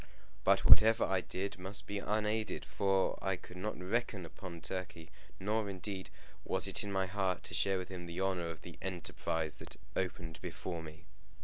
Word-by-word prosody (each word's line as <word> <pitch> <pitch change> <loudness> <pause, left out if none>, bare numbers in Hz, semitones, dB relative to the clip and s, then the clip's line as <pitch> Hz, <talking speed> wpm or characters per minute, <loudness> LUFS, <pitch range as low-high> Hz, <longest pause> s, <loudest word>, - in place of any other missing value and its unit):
But - - +5
whatever 115 +1 +9
I 95 -1 +2
did 95 +2 -3
must 95 +2 -2
be 100 0 -2
unaided, 105 +1 0
for 95 -1 +2
I 95 -1 +1
could 90 0 -11
not 105 +2 -3
reckon 100 0 0
upon 85 +1 -8
Turkey, 90 -2 -5 0.3
nor 105 +1 +1
indeed 95 0 -4 0.3
was - - +3
it - - -2
in 100 - -3
my 95 -1 +2
heart 95 -1 0
to - - -8
share 95 +4 +3
with 95 - -4
him 90 -2 -6
the 85 +1 -4
honour 95 -3 +1
of 80 - -7
the 85 -2 -9
enterprise 80 -3 -2
that - - -9 0.2
opened 80 -2 -2
before 85 -1 -4
me. 80 +1 -10
95 Hz, 180 wpm, -35 LUFS, 85-100 Hz, 0.3 s, whatever